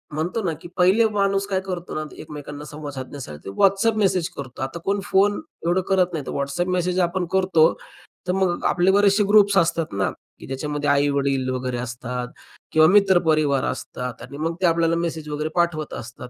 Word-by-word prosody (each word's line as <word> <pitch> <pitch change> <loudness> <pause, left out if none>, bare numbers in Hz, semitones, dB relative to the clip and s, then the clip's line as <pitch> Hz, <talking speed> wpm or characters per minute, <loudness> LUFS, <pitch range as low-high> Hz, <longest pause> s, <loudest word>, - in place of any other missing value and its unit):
म्हणतो 175 +8 -2
ना, 165 -3 0
की - - -9
पहिले 195 +5 +5
माणूस 200 -1 +1
काय 190 -2 0
करतो 180 -2 -6
ना, 155 - -2 0.2
एकमेकांना 150 -1 -8
संवाद 150 -1 -8
साधण्यासाठी 130 - -8
WhatsApp 200 +3 +4
मेसेज 190 -5 +1
करतो. 130 -3 -8
आता 135 +6 -4
कोण 200 +1 +1
फोन, 205 +1 +2 0.2
एवढं 175 +2 +2
करत 185 -2 +2
नाही. 150 -4 -4
तर - - -5
WhatsApp 140 +6 -1
मेसेज 180 0 0
आपण 180 +1 -2
करतो. 185 -4 +4 0.5
तर 180 - +2
मग 185 -2 0
आपले 175 +2 +3
बरेचशे 205 +1 +4
ग्रुप्स 205 -1 +5
असतात 165 -2 +1
ना, 95 -2 0 0.3
की - - -11
ज्याच्यामध्ये 145 +2 -2
आई-वडील 140 -2 +1
वगैरे 130 -1 -2
असतात 125 +1 -4 0.4
किंवा 160 0 +6
मित्रपरिवार 160 -8 +3
असतात 125 -2 -5
आणि 140 +3 -9
मग 165 +2 -2
ते 185 - +3
आपल्याला 165 0 +3
मेसेज 165 -2 -3
वगैरे 150 +1 -2
पाठवत 170 -3 0
असतात 125 +1 -8
165 Hz, 175 wpm, -23 LUFS, 140-190 Hz, 0.5 s, किंवा